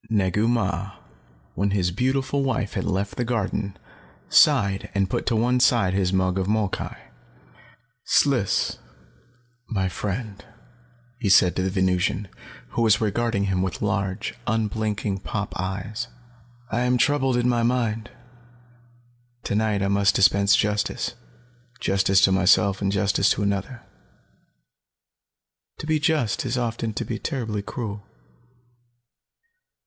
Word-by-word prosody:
Negu 105 Hz, 0 st, +1 dB
Mah, 100 Hz, -4 st, -1 dB, 0.6 s
when 100 Hz, +3 st, 0 dB
his 95 Hz, -3 st, 0 dB
beautiful 130 Hz, +6 st, 0 dB
wife 120 Hz, -6 st, -1 dB
had -, -, -2 dB
left 100 Hz, +1 st, -2 dB
the 125 Hz, -, 0 dB
garden, 105 Hz, -4 st, -2 dB, 0.5 s
sighed 95 Hz, -1 st, +4 dB
and 100 Hz, -1 st, +2 dB
put -, -, -2 dB
to 120 Hz, -, +2 dB
one 125 Hz, +3 st, +2 dB
side 120 Hz, -7 st, +3 dB
his 95 Hz, -2 st, +1 dB
mug 95 Hz, 0 st, +1 dB
of 95 Hz, -, -1 dB
molkai. 105 Hz, -2 st, -1 dB, 1.1 s
"Sliss, 125 Hz, -9 st, +1 dB, 0.9 s
my 95 Hz, -5 st, 0 dB
friend," 100 Hz, +2 st, -5 dB, 0.8 s
he 110 Hz, -5 st, -1 dB
said 90 Hz, -1 st, +5 dB
to -, -, 0 dB
the 95 Hz, -, 0 dB
Venusian, 95 Hz, +1 st, 0 dB, 0.4 s
who -, -, -2 dB
was 110 Hz, -2 st, +4 dB
regarding 110 Hz, -1 st, 0 dB
him 95 Hz, -2 st, 0 dB
with 95 Hz, +1 st, -3 dB
large, 100 Hz, -1 st, -2 dB
unblinking 110 Hz, -2 st, -1 dB
pop 105 Hz, +1 st, -4 dB
eyes, 100 Hz, +6 st, -4 dB, 0.6 s
"I 115 Hz, -, 0 dB
am 125 Hz, 0 st, +2 dB
troubled 135 Hz, 0 st, +2 dB
in 120 Hz, 0 st, +1 dB
my 120 Hz, -1 st, +2 dB
mind. 115 Hz, -3 st, 0 dB, 1.3 s
Tonight 105 Hz, -1 st, 0 dB
I -, -, +1 dB
must 100 Hz, 0 st, +2 dB
dispense 100 Hz, 0 st, +4 dB
justice. 105 Hz, 0 st, -1 dB, 0.7 s
Justice 95 Hz, 0 st, +2 dB
to 95 Hz, -, +5 dB
myself 95 Hz, +1 st, +3 dB
and 100 Hz, -1 st, +1 dB
justice 100 Hz, 0 st, +2 dB
to 105 Hz, -, +1 dB
another. 100 Hz, +5 st, -2 dB, 1.9 s
To -, -, -7 dB
be 155 Hz, 0 st, +1 dB
just 150 Hz, -8 st, +1 dB
is 125 Hz, -1 st, -2 dB
often 115 Hz, -2 st, -2 dB
to -, -, -3 dB
be -, -, -4 dB
terribly 115 Hz, -8 st, -3 dB
cruel." 105 Hz, -2 st, -6 dB
105 Hz, 130 wpm, -24 LUFS, 95-115 Hz, 1.9 s, said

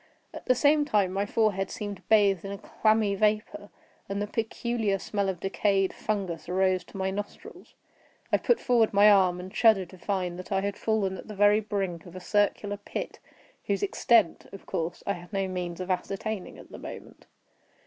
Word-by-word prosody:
At -, -, -10 dB
the 255 Hz, -, +5 dB
same 295 Hz, +4 st, +4 dB
time 205 Hz, -10 st, +1 dB
my 200 Hz, +1 st, -1 dB
forehead 205 Hz, -3 st, +1 dB
seemed 205 Hz, -5 st, -6 dB
bathed 200 Hz, -4 st, +4 dB
in 195 Hz, -, -5 dB
a 200 Hz, -, -5 dB
clammy 215 Hz, 0 st, +1 dB
vapor, 210 Hz, 0 st, 0 dB, 0.4 s
and 200 Hz, 0 st, -2 dB
the 205 Hz, -, 0 dB
peculiar 225 Hz, -1 st, -1 dB
smell 200 Hz, 0 st, -2 dB
of 185 Hz, -3 st, -3 dB
decayed 195 Hz, 0 st, +1 dB
fungus 185 Hz, -6 st, -3 dB
arose 185 Hz, 0 st, +2 dB
to 195 Hz, -, -11 dB
my 190 Hz, 0 st, -1 dB
nostrils. 205 Hz, +1 st, -8 dB, 0.6 s
I -, -, +7 dB
put 480 Hz, -, +2 dB
forward 235 Hz, -4 st, +2 dB
my 205 Hz, +1 st, +7 dB
arm, 185 Hz, -3 st, +4 dB
and 185 Hz, +3 st, -9 dB
shuddered 200 Hz, -6 st, +4 dB
to 185 Hz, -, -14 dB
find 180 Hz, -2 st, -2 dB
that 185 Hz, -, -9 dB
I 195 Hz, -1 st, +2 dB
had 200 Hz, 0 st, -2 dB
fallen 200 Hz, -4 st, -1 dB
at -, -, -11 dB
the 210 Hz, -, -8 dB
very 205 Hz, +1 st, +5 dB
brink 195 Hz, -5 st, -3 dB
of 175 Hz, -, -12 dB
a -, -, -6 dB
circular 205 Hz, +2 st, 0 dB
pit, 205 Hz, -, -6 dB, 0.5 s
whose 200 Hz, -1 st, -1 dB
extent, 205 Hz, -1 st, +2 dB
of 195 Hz, -, -11 dB
course, 165 Hz, +1 st, -3 dB
I 200 Hz, -, 0 dB
had 175 Hz, +1 st, -11 dB
no 195 Hz, -2 st, -1 dB
means 180 Hz, -2 st, -4 dB
of 185 Hz, +1 st, -3 dB
ascertaining 195 Hz, +2 st, -3 dB
at -, -, -14 dB
the -, -, -9 dB
moment. -, -, -10 dB
200 Hz, 190 wpm, -27 LUFS, 185-215 Hz, 0.6 s, I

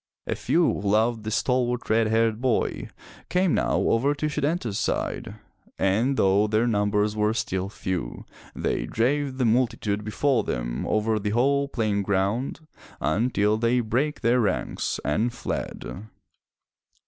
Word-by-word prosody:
A -, -, -1 dB
few -, -, +1 dB
who 100 Hz, -, 0 dB
loved 110 Hz, +2 st, +2 dB
the -, -, -2 dB
stalwart 125 Hz, +1 st, 0 dB
red 110 Hz, 0 st, +3 dB
haired 110 Hz, 0 st, +1 dB
boy, 125 Hz, -3 st, 0 dB, 0.4 s
came 180 Hz, -2 st, +2 dB
now -, -, +1 dB
over 135 Hz, +6 st, +2 dB
to 145 Hz, -, -3 dB
Setanta's 145 Hz, -, -1 dB
side, -, -, -2 dB, 0.4 s
and 115 Hz, +8 st, +1 dB
though 100 Hz, +2 st, +3 dB
their 110 Hz, +2 st, +2 dB
numbers 105 Hz, -2 st, +1 dB, 0.2 s
still 95 Hz, 0 st, -1 dB
were -, -, -6 dB
few, 90 Hz, -10 st, -4 dB, 0.3 s
they -, -, -1 dB
drave 135 Hz, +3 st, 0 dB
the 130 Hz, -, +1 dB
multitude 115 Hz, -3 st, +1 dB
before 115 Hz, +3 st, +1 dB
them -, -, -3 dB
over 110 Hz, 0 st, +1 dB
the 105 Hz, 0 st, -2 dB
whole 140 Hz, +5 st, +2 dB
playing 110 Hz, -6 st, 0 dB
ground 100 Hz, +9 st, -1 dB, 0.4 s
until 105 Hz, +3 st, +1 dB
they 120 Hz, +2 st, +2 dB
brake 125 Hz, +6 st, -1 dB
their 120 Hz, +2 st, +3 dB
ranks 100 Hz, -6 st, -1 dB
and 110 Hz, +12 st, 0 dB
fled. 110 Hz, -3 st, -5 dB
115 Hz, 140 wpm, -25 LUFS, 105-125 Hz, 0.4 s, red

